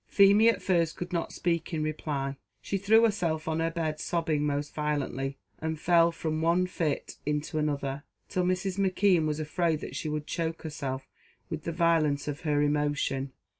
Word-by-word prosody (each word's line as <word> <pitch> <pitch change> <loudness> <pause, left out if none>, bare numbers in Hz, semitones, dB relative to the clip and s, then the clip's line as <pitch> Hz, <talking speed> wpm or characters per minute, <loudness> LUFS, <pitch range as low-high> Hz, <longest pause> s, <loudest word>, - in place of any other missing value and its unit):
Feemy, 200 +3 +6
at 230 - 0
first, 170 -4 +2
could 175 +1 -5
not 170 - -1
speak 170 -1 -1
in 155 - -1
reply; 145 -3 -2 0.2
she 195 - -2
threw 220 +4 +5
herself 170 -8 +1
on 160 0 0
her 165 0 +1
bed 160 -2 -2
sobbing 160 -4 0
most 145 0 -2
violently, 140 -3 -2 0.2
and 160 -1 -3
fell 170 0 +4
from 160 -1 -2
one 170 +3 +3
fit 165 -5 -2
into 150 +1 -1
another, 140 -2 -2 0.2
till 180 - 0
Mrs. 185 +1 -1
McKeon 185 -3 +3
was 150 0 -1
afraid 155 +1 0
that - - -7
she 155 - -3
would 150 0 -3
choke 165 +1 -3
herself 140 -4 -4 0.4
with - - -4
the 170 - -1
violence 160 -4 +2
of 145 0 -4
her 150 -2 +1
emotion. 145 -2 0
160 Hz, 175 wpm, -29 LUFS, 150-175 Hz, 0.4 s, Feemy